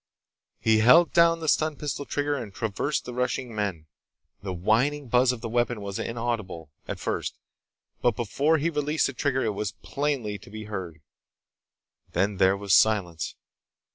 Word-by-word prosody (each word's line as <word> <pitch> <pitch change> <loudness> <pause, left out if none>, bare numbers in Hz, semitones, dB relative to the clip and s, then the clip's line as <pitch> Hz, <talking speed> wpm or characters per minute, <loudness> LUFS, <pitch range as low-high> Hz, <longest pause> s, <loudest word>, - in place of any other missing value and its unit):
He 110 -1 +3
held 145 +10 +6
down 165 -1 +5
the 160 - -4
stun 155 0 +2
pistol 145 -1 -4
trigger 145 +1 -1
and 115 -7 -5
traversed 110 +8 -2
the 125 - -6
rushing 125 -1 -2
men. 100 -7 -3 0.6
The 100 - -4
whining 120 +10 +1
buzz 125 +2 +4
of 125 -3 -6
the 120 - -4
weapon 120 0 0
was 100 -1 -5
inaudible, 110 -10 -3 0.2
at - - -4
first, - - -3 0.6
but 120 -3 +2
before 140 +8 +1
he 160 +3 0
released 150 +1 +1
the 140 - -2
trigger 130 +1 0
it 110 - 0
was 100 -1 -3
plainly 135 -8 -2
to - - -15
be 110 +1 -7
heard. 95 -7 -6 1.1
Then 100 +3 +1
there 95 0 +4
was 100 -1 0
silence. 90 -9 +2
115 Hz, 165 wpm, -26 LUFS, 100-140 Hz, 1.1 s, held